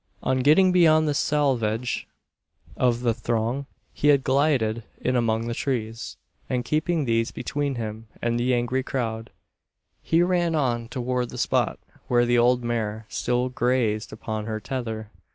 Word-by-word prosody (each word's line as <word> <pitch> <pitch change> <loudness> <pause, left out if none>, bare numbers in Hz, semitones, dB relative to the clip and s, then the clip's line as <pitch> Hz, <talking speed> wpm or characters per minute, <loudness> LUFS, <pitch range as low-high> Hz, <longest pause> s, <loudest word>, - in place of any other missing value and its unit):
On 130 0 +1
getting 155 +8 +5
beyond 155 -3 +5
the 145 - +1
selvedge 125 -6 0 0.7
of 120 -1 +1
the 120 -2 +2
throng, 120 +4 -2 0.3
he 145 - 0
had 140 -2 +5
glided 130 -5 +2 0.2
in 125 - 0
among 115 -1 +1
the 120 - -2
trees; 115 - -3 0.3
and 125 -2 -1
keeping 155 +1 0
these 115 -1 +1
between 145 -2 -3
him 110 -1 -5
and 120 0 0
the 125 +2 +1
angry 125 +1 +1
crowd, 115 -4 -3 0.7
he 165 +1 +3
ran 175 -2 +1
on 120 -6 0
toward 125 -1 -2
the - - -8
spot - - +1 0.3
where 120 -1 +3
the 120 0 +3
old 125 +1 +3
mare 110 -2 -2
still 125 +1 0
grazed 120 -4 0
upon 110 -1 -5
her 110 -1 -3
tether. 110 -1 -5
120 Hz, 150 wpm, -25 LUFS, 115-135 Hz, 0.7 s, getting